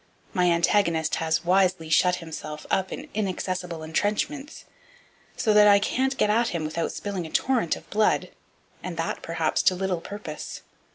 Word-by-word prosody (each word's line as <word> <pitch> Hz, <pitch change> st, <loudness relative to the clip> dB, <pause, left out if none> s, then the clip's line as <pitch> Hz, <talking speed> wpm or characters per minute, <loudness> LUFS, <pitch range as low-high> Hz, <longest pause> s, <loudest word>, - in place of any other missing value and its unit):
My 180 Hz, -1 st, +3 dB
antagonist 170 Hz, -1 st, +2 dB
has 160 Hz, +1 st, 0 dB
wisely 185 Hz, -2 st, +2 dB
shut 180 Hz, +2 st, +4 dB
himself 160 Hz, -3 st, -7 dB
up 190 Hz, 0 st, +1 dB
in 290 Hz, -, -6 dB
inaccessible 185 Hz, -4 st, -3 dB
entrenchments, 210 Hz, -, -2 dB, 0.7 s
so 215 Hz, -, +2 dB
that 210 Hz, 0 st, +7 dB
I 200 Hz, -1 st, +7 dB
can't 265 Hz, +6 st, 0 dB
get 210 Hz, -, +3 dB
at 230 Hz, +2 st, +2 dB
him 170 Hz, -7 st, -2 dB
without 165 Hz, +2 st, -2 dB
spilling 195 Hz, -5 st, -4 dB
a -, -, -10 dB
torrent 240 Hz, -3 st, +1 dB
of -, -, -13 dB
blood, 215 Hz, +1 st, +2 dB, 0.5 s
and -, -, -6 dB
that -, -, -2 dB
perhaps -, -, 0 dB
to 185 Hz, -, +3 dB
little 185 Hz, -2 st, -2 dB
purpose. 185 Hz, -6 st, -7 dB
185 Hz, 160 wpm, -25 LUFS, 165-210 Hz, 0.7 s, that